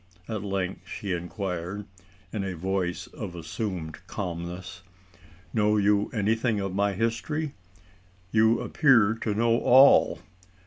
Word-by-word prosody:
at 110 -3 -3
length 95 -2 -3
she 100 - -5
inquired, 90 +2 -4 0.5
in 105 -3 -2
a 95 -2 -3
voice 90 0 -2
of 90 - -8
assumed 85 -2 -5
calmness. 90 0 -5 0.7
"Know 105 -1 +3
you 105 0 +2
anything 110 +1 +1
of 95 -1 -3
my 100 +1 +1
history? 115 - -2 0.8
You 110 +1 +4
appear 115 -8 +4
to 105 -2 -1
know 115 +1 +3
all. 135 +3 +6
100 Hz, 120 wpm, -27 LUFS, 90-110 Hz, 0.8 s, all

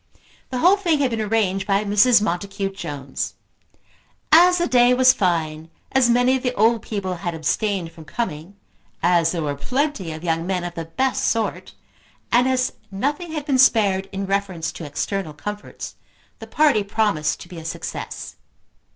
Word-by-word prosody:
The 255 - -3
whole 360 +10 +5
thing 345 -6 +1
had 275 -3 +1
been 225 -1 -1
arranged 200 -3 0
by 200 +1 +2
Mrs. 210 +2 +5
Montacute 195 +1 -3
Jones. 140 -6 -5 1.0
As 355 +2 +7
the 345 - +1
day 245 0 +4
was 255 0 +6
fine, 160 -4 -1 0.2
as 265 -2 +3
many 245 +2 +4
of 260 - -2
the 250 -1 -2
old 225 +2 +3
people 190 -4 -4
had 170 0 -4
abstained 175 +2 -1
from 165 -1 -13
coming, 165 0 -5 0.5
as 170 -1 +3
there 170 -3 -2
were 145 -1 -1
plenty 250 - -2
of 155 +1 -8
young 165 0 -1
men 185 -2 -1
of 175 -1 -5
the 165 -1 -5
best 260 +11 -1
sort, 225 -1 -2 0.6
and 245 +2 +4
as 255 -1 +1 0.2
nothing 290 - -3
had 300 -2 -4
been 275 -4 +1
spared 200 -6 +4
in 195 0 -3
reference 195 -4 -2
to 165 - -8
external 155 +3 -3
comforts, 210 +8 -7 0.5
the - - -9
party 295 -8 +3
promised 200 -7 0
to - - -10
be 175 -1 -9
a - - -10
success. 165 - -6
200 Hz, 170 wpm, -22 LUFS, 170-250 Hz, 1.0 s, As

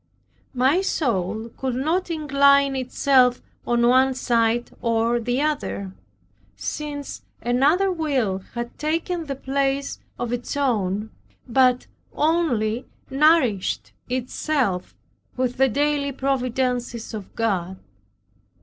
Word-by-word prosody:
My 265 +8 +3
soul 225 - -1
could 260 -2 -2
not 320 +8 0
incline 280 -3 +3
itself 255 -1 +3 0.3
on 240 0 +3
one 260 +1 +4
side 235 -1 +1
or 230 0 +1
the 245 +3 -1
other, 285 -10 -2 0.6
since 290 -2 -5 0.2
another 290 +11 +2
will 270 - 0 0.2
had 240 0 -5
taken 330 +2 -2
the 275 - -3
place 275 +1 -1 0.2
of 240 0 -3
its 245 +4 -3
own, 215 -6 0 0.4
but 250 0 +3 0.3
only 260 -8 +1 0.2
nourished 270 - +2 0.2
itself 255 -5 -1 0.4
with 255 0 -1
the 265 0 +4
daily 285 +2 0
providences 250 -3 -1
of 210 -3 -8
God. 190 -5 -1
255 Hz, 105 wpm, -23 LUFS, 235-285 Hz, 0.6 s, one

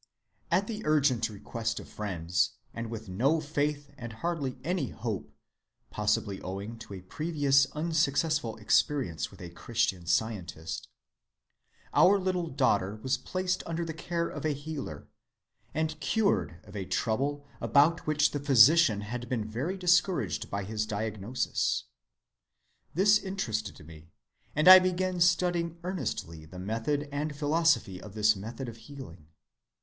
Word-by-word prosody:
"At 195 - +2
the 220 0 -5
urgent 135 -6 +2
request 115 +2 -4
of - - -10
friends, 90 -4 -1 0.2
and 115 -1 -5
with 110 -1 -7
no 130 - +2
faith 145 -1 -2
and 120 -1 -6
hardly 145 -1 -3
any 170 -4 -1
hope 100 -11 -5 0.6
(possibly 100 -2 0
owing 100 +5 -6
to 105 -3 -9
a 95 - -8
previous 140 - +2
unsuccessful 155 -4 0
experience 110 - +1
with 95 - -16
a 85 -1 -8
Christian 105 -2 -1
Scientist), 85 - -2 1.1
our 200 +2 +6
little 185 -2 -1
daughter 105 -9 +1
was 130 0 +2
placed 185 +6 -2
under 170 0 -2
the 160 - -4
care 170 +1 -2
of - - -7
a 155 -1 +1
healer, 145 - -6 0.6
and 155 0 -2
cured 135 - +1
of 100 0 -14
a 100 - -3
trouble 140 +9 -1 0.2
about 155 +4 +3
which 150 0 +3
the 145 - -2
physician 140 -2 +6
had 120 +3 -6
been 110 -4 -1
very 135 - -3
discouraging 180 0 +2
in 100 -1 -2
his 110 +1 -2
diagnosis. 110 +2 -1 1.1
This 205 +4 +5
interested 115 - -4
me, 80 0 -14 0.5
and 155 +3 +2
I 185 0 +13
began 185 0 0
studying 175 -1 +2
earnestly 85 - -4
the 85 +4 -12
method 115 +10 -2
and 145 +1 -3
philosophy 145 - +1
of 105 -1 -11
this 110 0 +4
method 115 +6 -6
of 115 -1 -8
healing. 115 - -11
135 Hz, 140 wpm, -29 LUFS, 105-160 Hz, 1.1 s, I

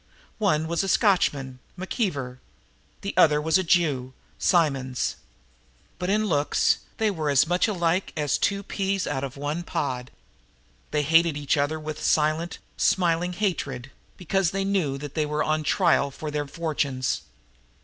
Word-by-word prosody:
One 160 -7 +1
was 170 +3 0
a - - -2
Scotchman, 145 - +2 0.2
McKeever; 160 - -3 0.6
the 200 - -4
other 150 -5 +5
was 160 +3 +2
a - - 0
Jew, 150 -8 +1 0.3
Simonds. 135 -8 +1 0.8
But 180 - -2
in 215 +2 +2
looks 150 -7 +2 0.2
they 220 -1 +2
were 155 -5 -2
as 140 0 +4
much 175 +4 +2
alike 180 -2 0
as 150 -3 0
two 200 0 0
peas 195 -1 -1
out 135 - -2
of 140 0 -5
one 145 +4 -2
pod. 135 -8 -3 0.8
They 150 -1 0
hated 165 0 +4
each 145 -1 +1
other 145 +2 0
with 155 0 -6
silent, 155 +3 +1 0.2
smiling 175 -1 +2
hatred, 175 - -2 0.3
because 185 0 +1
they 195 +1 -2
knew 180 -9 0
that 145 0 -7
they 155 -2 0
were 150 0 0
on 155 0 0
trial 155 -2 +2
for 150 +2 -6
their 145 -1 -2
fortunes. 140 -4 -2
155 Hz, 150 wpm, -25 LUFS, 145-185 Hz, 0.8 s, other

